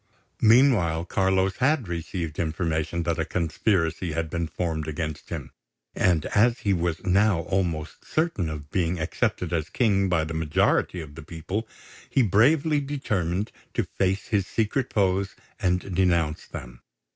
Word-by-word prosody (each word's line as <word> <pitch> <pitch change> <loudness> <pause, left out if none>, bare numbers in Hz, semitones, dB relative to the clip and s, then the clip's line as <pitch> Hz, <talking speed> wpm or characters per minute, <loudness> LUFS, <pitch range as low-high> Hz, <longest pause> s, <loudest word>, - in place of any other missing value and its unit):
Meanwhile, 110 - +4
Carlos 95 +1 +1
had 135 -3 +2
received 85 -2 -4
information 80 0 -1
that 85 -1 -1
a - - +2
conspiracy 85 0 0
had 80 0 -2
been 85 -1 -1
formed 80 -2 -3
against 80 -1 -4
him; - - -5 0.4
and 85 -4 +2
as 115 +3 +2
he 100 - +2
was 85 -2 -1
now 95 -1 +3
almost 85 -4 -2
certain 155 - -1
of 75 -1 -7
being 90 -1 0
accepted 80 +2 -1
as 80 -2 -1
King 100 -5 +2
by 85 -3 +2
the 80 +1 -4
majority 80 +3 +1
of 75 -2 -10
the 80 - -9
people, 85 +8 -5 0.4
he 135 - +3
bravely 140 - +4
determined 105 - -2 0.2
to - - +2
face 95 +1 -1
his 100 -3 +1
secret 115 +6 -1
foes 95 -1 +1 0.2
and 90 +1 0
denounce 85 -4 +1
them. - - -9
90 Hz, 145 wpm, -25 LUFS, 80-100 Hz, 0.4 s, Meanwhile